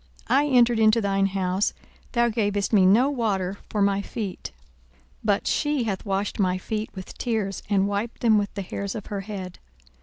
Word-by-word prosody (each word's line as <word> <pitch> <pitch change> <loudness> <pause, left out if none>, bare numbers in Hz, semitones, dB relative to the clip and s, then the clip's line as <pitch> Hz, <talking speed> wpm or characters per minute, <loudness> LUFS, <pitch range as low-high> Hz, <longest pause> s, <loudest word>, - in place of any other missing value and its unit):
I 285 +2 +4
entered 240 -4 +4
into 220 +1 +5
thine 195 -2 +1
house, 190 0 0 0.4
thou 235 -1 +3
gavest 205 -2 -1
me 190 -3 +6
no 230 +8 +5
water 200 -7 -1
for 210 -2 +1
my 200 0 +2
feet: 200 -2 -5 0.7
but 205 -2 +1
she 295 -4 +1
hath 205 -2 -3
washed 195 +2 -1
my 185 -2 +2
feet 215 +3 -4
with 190 -1 -8
tears, 215 -5 -1
and 200 -1 +3
wiped 205 +3 -3
them 220 -3 +5
with 205 -1 -2
the 200 - -3
hairs 200 +2 -4
of 210 - -6
her 200 - -2
head. 190 -3 -7
205 Hz, 180 wpm, -25 LUFS, 195-225 Hz, 0.7 s, me